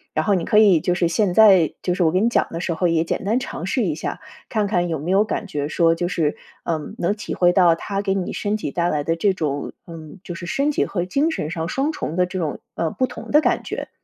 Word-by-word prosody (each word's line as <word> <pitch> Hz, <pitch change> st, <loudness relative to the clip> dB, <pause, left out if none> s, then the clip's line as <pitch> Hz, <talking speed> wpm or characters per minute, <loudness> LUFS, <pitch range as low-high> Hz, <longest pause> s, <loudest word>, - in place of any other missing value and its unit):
然 155 Hz, -, +1 dB
后 205 Hz, -, +3 dB
你 175 Hz, -3 st, 0 dB
可 210 Hz, -, +2 dB
以 195 Hz, -7 st, +6 dB
就 180 Hz, -, 0 dB
是 175 Hz, -1 st, +1 dB
现 185 Hz, +2 st, +1 dB
在 190 Hz, -5 st, +6 dB
就 180 Hz, -, 0 dB
是 180 Hz, -, -3 dB
我 160 Hz, -, +4 dB
给 185 Hz, -, +2 dB
你 230 Hz, -, +3 dB
讲 235 Hz, -, +1 dB
的 165 Hz, -, -5 dB
时 175 Hz, -, -2 dB
候 175 Hz, +2 st, +1 dB
也 165 Hz, -1 st, +2 dB
简 -, -, -3 dB
单 220 Hz, +6 st, +1 dB
尝 -, -, -6 dB
试 -, -, 0 dB
一 -, -, 0 dB
下， -, -, -5 dB, 0.3 s
看 215 Hz, -2 st, 0 dB
看 175 Hz, -3 st, 0 dB
有 160 Hz, -, -1 dB
没 160 Hz, +6 st, -3 dB
有 195 Hz, +2 st, +4 dB
感 215 Hz, -, -3 dB
觉 145 Hz, -6 st, -3 dB
说 165 Hz, +1 st, +3 dB
就 175 Hz, +1 st, -2 dB
是， 160 Hz, -5 st, 0 dB, 0.3 s
嗯， 160 Hz, -3 st, -3 dB
能 175 Hz, +4 st, 0 dB
体 210 Hz, -, -5 dB
会 175 Hz, -1 st, +3 dB
到 175 Hz, -4 st, +5 dB
它 195 Hz, +3 st, -3 dB
给 195 Hz, -1 st, 0 dB
你 185 Hz, -, -3 dB
身 210 Hz, +1 st, -1 dB
体 145 Hz, -, -4 dB
带 175 Hz, 0 st, 0 dB
来 145 Hz, -1 st, -1 dB
的 165 Hz, +2 st, 0 dB
这 195 Hz, +4 st, +2 dB
种 145 Hz, -5 st, -3 dB
嗯， 165 Hz, +2 st, -11 dB
就 175 Hz, -, -6 dB
是 175 Hz, +1 st, -7 dB
身 280 Hz, +9 st, +1 dB
体 -, -, +1 dB
和 175 Hz, -3 st, -2 dB
精 280 Hz, -, +1 dB
神 165 Hz, -, -3 dB
上 165 Hz, -2 st, -3 dB
双 275 Hz, +3 st, 0 dB
重 165 Hz, -, -5 dB
的 180 Hz, 0 st, +3 dB
这 185 Hz, +1 st, -5 dB
种， 155 Hz, -4 st, -3 dB
呃， 165 Hz, -, -1 dB
不 255 Hz, -, 0 dB
同 -, -, -9 dB
的 300 Hz, -, +5 dB
感 -, -, +1 dB
觉？ -, -, -5 dB
180 Hz, 300 characters per minute, -21 LUFS, 165-205 Hz, 0.3 s, 以